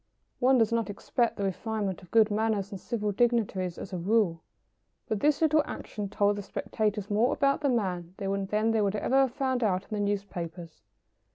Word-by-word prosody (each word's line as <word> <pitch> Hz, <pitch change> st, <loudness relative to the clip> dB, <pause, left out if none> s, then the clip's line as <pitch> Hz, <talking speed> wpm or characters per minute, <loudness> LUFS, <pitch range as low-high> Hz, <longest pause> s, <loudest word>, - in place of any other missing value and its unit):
One 260 Hz, +1 st, +4 dB
does 225 Hz, -1 st, +3 dB
not 230 Hz, -2 st, 0 dB
expect 235 Hz, +3 st, -1 dB
the 200 Hz, -, -2 dB
refinement 200 Hz, 0 st, -2 dB
of 180 Hz, -, -16 dB
good 220 Hz, -2 st, +4 dB
manners 210 Hz, -2 st, 0 dB
from 200 Hz, -3 st, -7 dB
civic 210 Hz, -3 st, -3 dB
dignitaries, 210 Hz, -7 st, +1 dB
as 195 Hz, -, -8 dB
a 180 Hz, -, -2 dB
rule, 185 Hz, -3 st, +1 dB, 0.7 s
but 215 Hz, -, -1 dB
this 300 Hz, +4 st, +2 dB
little 310 Hz, 0 st, +4 dB
action 205 Hz, -2 st, -5 dB
told 205 Hz, 0 st, +2 dB
the -, -, -3 dB
spectators 210 Hz, +1 st, -2 dB
more 220 Hz, +5 st, +3 dB
about 275 Hz, 0 st, +1 dB
the 285 Hz, -, +2 dB
man 185 Hz, -7 st, -1 dB
than 200 Hz, +2 st, 0 dB
they 225 Hz, -1 st, +2 dB
would 200 Hz, 0 st, +1 dB
ever 255 Hz, +5 st, +1 dB
have 265 Hz, -3 st, +3 dB
found 260 Hz, -2 st, 0 dB
out 190 Hz, -3 st, +1 dB
in -, -, -23 dB
the 210 Hz, -, -2 dB
newspapers. 175 Hz, -5 st, -4 dB
210 Hz, 190 wpm, -28 LUFS, 195-230 Hz, 0.7 s, One